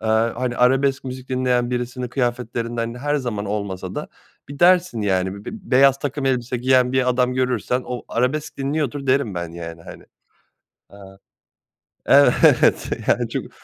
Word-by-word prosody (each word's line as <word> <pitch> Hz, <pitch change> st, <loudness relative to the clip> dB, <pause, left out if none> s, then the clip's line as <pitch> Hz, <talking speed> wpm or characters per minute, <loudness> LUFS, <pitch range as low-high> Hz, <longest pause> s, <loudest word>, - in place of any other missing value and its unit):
aaa, 110 Hz, +1 st, +1 dB
hani, 125 Hz, -1 st, -2 dB
arabesk 135 Hz, +2 st, +2 dB
müzik 130 Hz, 0 st, -7 dB
dinleyen 125 Hz, -1 st, 0 dB
birisinin 125 Hz, 0 st, -3 dB
kıyafetlerinden 120 Hz, -2 st, -2 dB
-her 145 Hz, +4 st, -1 dB
zaman 115 Hz, -6 st, -4 dB
olmasa 100 Hz, -2 st, -4 dB
da -, -, -5 dB, 0.4 s
bir 140 Hz, 0 st, -9 dB
dersin, 175 Hz, -8 st, +4 dB
yani, 95 Hz, -1 st, 0 dB
bi 100 Hz, +1 st, -11 dB
b 220 Hz, -4 st, -9 dB
beyaz 135 Hz, +1 st, +5 dB
takım 140 Hz, 0 st, -3 dB
elbise 125 Hz, -1 st, -1 dB
giyen 125 Hz, 0 st, +2 dB
bir 130 Hz, -1 st, +2 dB
adam 125 Hz, 0 st, +1 dB
görürsen 125 Hz, -1 st, -1 dB
o 125 Hz, -1 st, -5 dB
arabesk 130 Hz, +6 st, -1 dB
dinliyordur 140 Hz, 0 st, -2 dB
derim 130 Hz, -6 st, +1 dB
ben 85 Hz, -1 st, -5 dB
yani, 85 Hz, -1 st, -8 dB
hani. -, -, -12 dB, 0.9 s
Aaa 95 Hz, -1 st, -14 dB, 0.9 s
Evet, -, -, +4 dB, 0.2 s
yani -, -, +2 dB
çünkü -, -, -4 dB
125 Hz, 150 wpm, -21 LUFS, 115-135 Hz, 0.9 s, beyaz